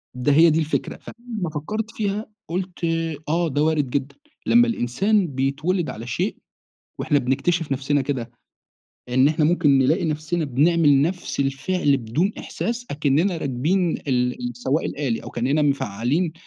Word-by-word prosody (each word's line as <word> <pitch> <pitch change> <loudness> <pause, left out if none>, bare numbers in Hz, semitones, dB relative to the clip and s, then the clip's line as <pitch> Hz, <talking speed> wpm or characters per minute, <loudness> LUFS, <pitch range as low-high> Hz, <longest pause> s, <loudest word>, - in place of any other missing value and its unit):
ده 125 +3 +1
هي 160 +4 +6
دي 160 +1 +2
الفكرة 155 -1 -2
فلما 225 -6 -6
فكرت 210 +9 -4
فيها 210 -1 -2 0.2
قلت 180 +2 -4 0.5
آه، 170 +2 +1
ده 145 +1 +1
وارد 155 -4 +1
جدًا 140 +2 -2 0.3
لمّا 240 +1 +5
الإنسان 195 - +1
بيتولد 145 +6 -1
على 115 +2 -7
شيء 120 - -2 0.6
وإحنا 150 -2 +2
بنكتشف 145 +5 0
نفسنا 135 +1 0
كده، 125 -4 -3 0.8
إن 130 +3 +4
إحنا 155 0 +1
ممكن 150 -4 +4
نلاقي 155 +8 +2
نفسنا 155 +2 -1
بنعمل 145 +1 +3
نفس 175 +1 -2
الفعل 140 +3 +1
بدون 135 - 0
إحساس، 240 +2 -4
أكننا 155 +6 +1
راكبين 160 +6 0 0.2
ال 125 -1 0
السواق 130 +5 -1
الآلي 135 -6 -2
أو - - -8
كأننا 135 +6 0
مفعلين 140 - 0
150 Hz, 140 wpm, -23 LUFS, 135-175 Hz, 0.8 s, هي